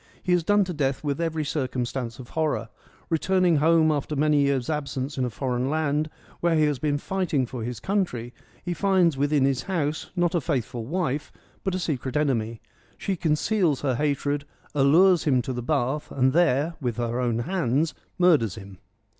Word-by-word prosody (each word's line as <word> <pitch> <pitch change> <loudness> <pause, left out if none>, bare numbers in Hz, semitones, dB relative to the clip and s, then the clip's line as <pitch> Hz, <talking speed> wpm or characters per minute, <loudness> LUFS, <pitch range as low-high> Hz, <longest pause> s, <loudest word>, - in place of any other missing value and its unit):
He 180 - +1
is 175 -2 +2
done 205 +4 +4
to 180 -1 -4
death 140 -3 -1
with 145 +1 -1
every 160 -2 -1
circumstance 130 -4 -3
of 125 -2 -10
horror; 155 -7 -1 0.4
returning 180 0 +3
home 160 +1 +4
after 150 0 -2
many 150 +1 +3
years' 140 -3 +1
absence 140 -2 -3
in 130 - 0
a - - -2
foreign 125 +4 -2
land, 155 0 0 0.3
where 170 -1 +2
he 155 - +3
has 150 -3 +1
been 145 -2 0
fighting 165 -5 -1
for 120 -1 -6
his 120 -1 -4
country, 125 - -2 0.3
he 175 - -1
finds 185 -4 +3
within 145 0 +2
his 135 -2 +1
house 155 -3 -2
not 175 0 +1
a 170 - +1
faithful 120 -5 -2
wife, 150 -3 -2 0.3
but 190 -1 -1
a - - 0
secret 145 -6 -2
enemy; 115 -6 0 0.4
she 195 - -2
conceals 165 -1 +1
her 135 -3 +1
hatred, 145 +1 0 0.3
allures 160 +6 +5
him 135 -4 +3
to 130 - -3
the 125 - -3
bath, 140 +2 -1
and 130 -1 +2
there, 160 -1 +3
with 120 -3 -2
her 120 0 -1
own 120 -2 0
hands, 150 +1 0 0.2
murders 155 - +3
him. 100 -3 -11
145 Hz, 180 wpm, -25 LUFS, 130-165 Hz, 0.4 s, allures